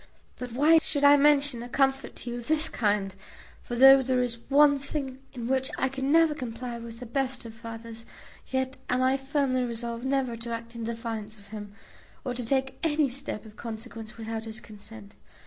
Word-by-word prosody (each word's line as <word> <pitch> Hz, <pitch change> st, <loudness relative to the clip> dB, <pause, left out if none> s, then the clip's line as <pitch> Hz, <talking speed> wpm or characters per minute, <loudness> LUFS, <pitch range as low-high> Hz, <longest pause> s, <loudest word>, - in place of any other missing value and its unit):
But 250 Hz, -2 st, -6 dB
why 305 Hz, +6 st, +6 dB
should 290 Hz, -2 st, -2 dB
I 285 Hz, 0 st, +9 dB
mention 285 Hz, -3 st, +4 dB
a 240 Hz, -, -7 dB
comfort 270 Hz, +1 st, +1 dB
to 240 Hz, -, -5 dB
you 240 Hz, -, -4 dB
of 235 Hz, -, -9 dB
this 315 Hz, 0 st, +3 dB
kind; 205 Hz, -3 st, 0 dB, 0.5 s
for 240 Hz, -, -5 dB
though 270 Hz, +2 st, +9 dB
there 255 Hz, -1 st, +1 dB
is 235 Hz, -1 st, -3 dB
one 285 Hz, 0 st, +6 dB
thing 275 Hz, -2 st, -4 dB
in 240 Hz, -3 st, -5 dB
which 265 Hz, 0 st, +1 dB
I 265 Hz, -, +1 dB
can 270 Hz, +1 st, -2 dB
never 325 Hz, -1 st, +5 dB
comply 245 Hz, -3 st, -5 dB
with 230 Hz, 0 st, -9 dB
the 250 Hz, -, -7 dB
best 260 Hz, +1 st, -2 dB
of 225 Hz, -, -8 dB
fathers, 230 Hz, 0 st, -8 dB, 0.4 s
yet 260 Hz, 0 st, -2 dB
am 255 Hz, +1 st, +2 dB
I 260 Hz, +1 st, +3 dB
firmly 270 Hz, -1 st, 0 dB
resolved 235 Hz, -1 st, -3 dB
never 265 Hz, -3 st, 0 dB
to 230 Hz, +1 st, -7 dB
act 230 Hz, 0 st, -5 dB
in 230 Hz, -1 st, -5 dB
defiance 225 Hz, -2 st, -5 dB
of 200 Hz, -1 st, -16 dB
him, 205 Hz, -1 st, -8 dB, 0.5 s
or 250 Hz, -, -1 dB
to 245 Hz, 0 st, -2 dB
take 265 Hz, +2 st, 0 dB
any 305 Hz, -3 st, +2 dB
step 245 Hz, -4 st, -4 dB
of 215 Hz, -1 st, -13 dB
consequence 225 Hz, -1 st, -7 dB
without 225 Hz, 0 st, -5 dB
his 220 Hz, +1 st, -6 dB
consent. 210 Hz, -1 st, -12 dB
245 Hz, 200 wpm, -28 LUFS, 230-270 Hz, 0.5 s, I